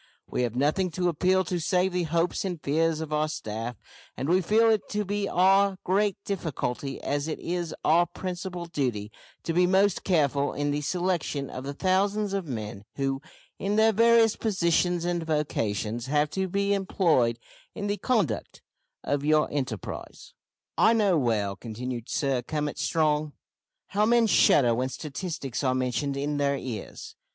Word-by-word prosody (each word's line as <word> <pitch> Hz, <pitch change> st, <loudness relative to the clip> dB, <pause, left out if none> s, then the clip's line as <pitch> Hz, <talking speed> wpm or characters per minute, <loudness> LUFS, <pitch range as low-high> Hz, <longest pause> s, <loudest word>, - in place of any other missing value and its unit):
We -, -, -2 dB
have 120 Hz, -2 st, -1 dB
nothing 155 Hz, +8 st, +1 dB
to 180 Hz, -1 st, +1 dB
appeal 185 Hz, +3 st, +2 dB
to 180 Hz, 0 st, -2 dB
save 180 Hz, +2 st, +1 dB
the 180 Hz, -1 st, 0 dB
hopes 170 Hz, +2 st, 0 dB
and 180 Hz, -4 st, -3 dB
fears 160 Hz, +2 st, +1 dB
of 155 Hz, -1 st, -4 dB
our 150 Hz, 0 st, +1 dB
staff; 115 Hz, -3 st, -5 dB, 0.4 s
and 135 Hz, -, -3 dB
we 180 Hz, +3 st, +3 dB
feel 220 Hz, +5 st, +3 dB
it 215 Hz, -3 st, 0 dB
to 210 Hz, -1 st, -1 dB
be 205 Hz, +1 st, -2 dB
our 195 Hz, +2 st, +4 dB
great 200 Hz, +2 st, +1 dB
difficulty, 140 Hz, -7 st, -3 dB
as 145 Hz, +1 st, -1 dB
it 155 Hz, -, -3 dB
is 175 Hz, -1 st, -3 dB
our 170 Hz, +3 st, +4 dB
principal 180 Hz, 0 st, -5 dB
duty, 125 Hz, -10 st, -2 dB, 0.3 s
to 165 Hz, -, -2 dB
be 180 Hz, +1 st, +4 dB
most 195 Hz, +1 st, +3 dB
careful 145 Hz, -6 st, +1 dB
in 145 Hz, 0 st, -1 dB
the 145 Hz, +1 st, -1 dB
selection 170 Hz, -4 st, -1 dB
of 130 Hz, +1 st, -6 dB
the 140 Hz, +1 st, -5 dB
thousands 200 Hz, +3 st, +1 dB
of 195 Hz, -4 st, -2 dB
men 105 Hz, -6 st, -5 dB
who, 135 Hz, -1 st, -1 dB, 0.4 s
in 200 Hz, +1 st, -1 dB
their 220 Hz, +1 st, +4 dB
various 230 Hz, 0 st, +5 dB
positions 175 Hz, -4 st, +1 dB
and 175 Hz, -1 st, 0 dB
vocations, 120 Hz, -7 st, -2 dB
have 150 Hz, +1 st, +1 dB
to 190 Hz, 0 st, -1 dB
be 200 Hz, +2 st, 0 dB
employed 170 Hz, -, +2 dB, 0.4 s
in 205 Hz, -, -4 dB
the 205 Hz, 0 st, -1 dB
conduct 195 Hz, -, -1 dB, 0.4 s
of 145 Hz, 0 st, -1 dB
your 155 Hz, 0 st, +3 dB
enterprise. 130 Hz, -9 st, -5 dB, 0.5 s
"I 225 Hz, -, +6 dB
know 205 Hz, -5 st, +3 dB
well," 110 Hz, -8 st, 0 dB
continued 120 Hz, +2 st, -6 dB
Sir 135 Hz, -3 st, 0 dB
Cummit 150 Hz, +3 st, -3 dB
Strong, 155 Hz, -2 st, +1 dB, 0.6 s
"how 210 Hz, +1 st, +2 dB
men 235 Hz, 0 st, +4 dB
shudder 130 Hz, -, +5 dB
when 130 Hz, +3 st, -1 dB
statistics 145 Hz, -1 st, -5 dB
are 130 Hz, -1 st, +2 dB
mentioned 130 Hz, +2 st, -1 dB
in 145 Hz, +1 st, -1 dB
their 140 Hz, -1 st, +1 dB
ears! 120 Hz, -6 st, -7 dB
160 Hz, 165 wpm, -27 LUFS, 135-190 Hz, 0.6 s, I